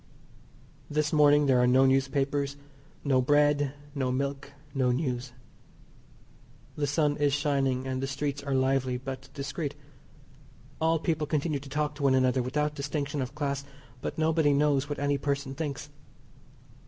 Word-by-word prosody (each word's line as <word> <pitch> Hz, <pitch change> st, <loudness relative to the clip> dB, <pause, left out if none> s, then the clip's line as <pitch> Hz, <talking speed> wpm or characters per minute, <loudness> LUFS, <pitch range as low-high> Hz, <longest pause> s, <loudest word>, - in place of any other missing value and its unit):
This 150 Hz, +1 st, 0 dB
morning 145 Hz, -1 st, +5 dB
there 130 Hz, -3 st, +4 dB
are 125 Hz, -, +4 dB
no 130 Hz, +2 st, +5 dB
newspapers, 140 Hz, +1 st, +1 dB, 0.5 s
no 135 Hz, -3 st, +3 dB
bread, 145 Hz, 0 st, +3 dB, 0.2 s
no 130 Hz, -3 st, -1 dB
milk, 140 Hz, +1 st, -3 dB, 0.2 s
no 130 Hz, -2 st, +1 dB
news. 125 Hz, -2 st, -2 dB, 1.4 s
The 145 Hz, -1 st, -1 dB
sun 145 Hz, 0 st, +1 dB
is 145 Hz, -1 st, +2 dB
shining, 135 Hz, -3 st, 0 dB
and 130 Hz, 0 st, -2 dB
the 135 Hz, -, -1 dB
streets 140 Hz, +1 st, -3 dB
are 140 Hz, -1 st, -2 dB
lively 130 Hz, -1 st, +1 dB
but 135 Hz, +1 st, -7 dB
discreet. 140 Hz, +1 st, -4 dB, 1.1 s
All 165 Hz, +1 st, +3 dB
people 155 Hz, -1 st, -1 dB
continue 150 Hz, -1 st, 0 dB
to 135 Hz, 0 st, -11 dB
talk 150 Hz, +1 st, -1 dB
to 145 Hz, -, -10 dB
one 130 Hz, -, +4 dB
another 130 Hz, 0 st, +3 dB
without 150 Hz, +4 st, -1 dB
distinction 145 Hz, 0 st, -3 dB
of 130 Hz, +2 st, -5 dB
class, 140 Hz, -2 st, -2 dB, 0.4 s
but -, -, -4 dB
nobody 160 Hz, -2 st, +3 dB
knows 145 Hz, -1 st, +2 dB
what 145 Hz, -, -3 dB
any 145 Hz, 0 st, 0 dB
person 140 Hz, -1 st, -2 dB
thinks. 145 Hz, -1 st, -5 dB
140 Hz, 150 wpm, -28 LUFS, 135-145 Hz, 1.4 s, morning